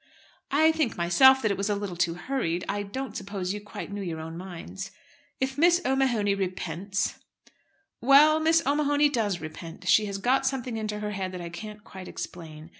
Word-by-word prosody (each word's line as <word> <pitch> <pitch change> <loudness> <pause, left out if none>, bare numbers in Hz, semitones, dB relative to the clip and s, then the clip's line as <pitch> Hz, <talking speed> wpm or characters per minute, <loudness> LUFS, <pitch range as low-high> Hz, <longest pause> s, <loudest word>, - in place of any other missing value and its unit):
"I 315 +3 +4
think 315 -6 -1
myself 265 +10 +6
that 215 - +2
it 200 - -1
was 200 +2 -1
a 205 - +1
little 200 -3 -4
too 170 0 0
hurried. 180 -5 -2
I 205 +1 -1
don't 215 +3 -5
suppose 195 -2 -3
you 210 - -5
quite 205 -1 -8
knew 205 0 -4
your 170 -4 -4
own 160 +1 -7
minds." 185 +2 -7 0.5
"If 265 +1 -2
Miss 345 +2 +5
O'Mahony 250 -7 +2
repents 190 +1 -2 0.4
" 320 0 -43
"Well, 290 +5 +6
Miss 325 +1 +3
O'Mahony 290 +1 +3
does 210 - -1
repent. 165 +3 -8
She 215 +2 +5
has 200 -1 -3
got 260 +6 +2
something 255 -3 -2
into 215 -1 -3
her 210 0 -3
head 190 -2 -3
that 180 - -5
I 170 - -6
can't 210 +4 -9
quite 190 -3 -10
explain. 160 -2 -8
205 Hz, 190 wpm, -27 LUFS, 180-265 Hz, 0.5 s, myself